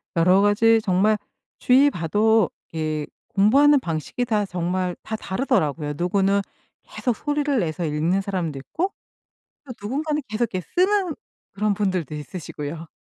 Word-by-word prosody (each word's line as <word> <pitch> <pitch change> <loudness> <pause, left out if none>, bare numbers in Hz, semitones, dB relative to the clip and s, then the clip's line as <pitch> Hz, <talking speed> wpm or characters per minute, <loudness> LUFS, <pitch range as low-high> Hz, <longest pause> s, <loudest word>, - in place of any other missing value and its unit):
여러 180 +3 +5
가지 225 +3 +4
정말 205 +2 +3 0.4
주위 265 +3 +5
봐도 210 - +2 0.2
이렇게 155 -2 -2 0.2
공부하는 275 +9 +5
방식이 170 - -3
다 215 -3 +1
정말 180 0 -2
다 220 - -4
다르더라고요. 190 - -1
누구는 195 +3 +2 0.4
계속 245 -4 -2
소리를 290 0 0
내서 170 -1 -2
읽는 160 +5 0
사람도 180 -7 -3
있고 350 - -3 0.7
또 255 - -7
누군가는 295 +8 -2
계속 215 +3 -1
이렇게 185 - -1
쓰는 370 -3 +2 0.4
그런 210 +1 +1
분들도 185 -7 -1
있으시고요. 150 0 -7
200 Hz, 320 characters per minute, -23 LUFS, 170-245 Hz, 0.7 s, 여러